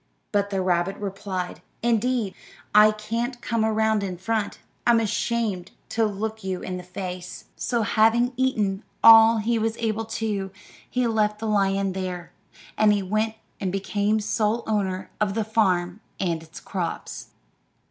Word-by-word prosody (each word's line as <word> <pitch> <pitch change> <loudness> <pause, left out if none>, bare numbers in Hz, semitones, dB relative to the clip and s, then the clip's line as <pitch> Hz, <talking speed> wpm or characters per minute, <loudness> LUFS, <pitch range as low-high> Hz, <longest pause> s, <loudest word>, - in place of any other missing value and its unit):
But 200 -1 +1
the 195 -2 -1
rabbit 180 +1 +1
replied, 195 -2 -4 0.2
"Indeed, 235 -2 +1 0.4
I 210 +1 +8
can't 230 +4 -3
come 230 -2 -1
around 220 -1 +2
in 185 -3 -4
front; 215 +3 -2 0.3
I'm 235 -1 +6
ashamed 215 -4 -1 0.2
to 225 0 +1
look 220 +1 -4
you 190 -1 -3
in 185 -1 -4
the 180 - -7
face." 180 0 -7
So, 235 -2 -1
having 225 +4 +3
eaten 215 -7 0 0.2
all 225 0 +9
he 225 +2 +1
was 225 +1 -1
able 225 -1 -1
to, 215 -3 -2 0.4
he 250 -1 0
left 215 -2 +1
the 225 - -6
lion 195 -2 +1
there, 185 -2 -5 0.5
and 205 -3 +3
went 220 +1 +1 0.2
and 190 -2 -2
became 205 +2 0
sole 215 +2 0
owner 190 -4 -1
of 205 -1 +1
the 225 - +1
farm 185 -4 +1 0.2
and 170 -4 -1
its 160 0 -11
crops. 175 -4 -5
210 Hz, 145 wpm, -25 LUFS, 190-225 Hz, 0.5 s, all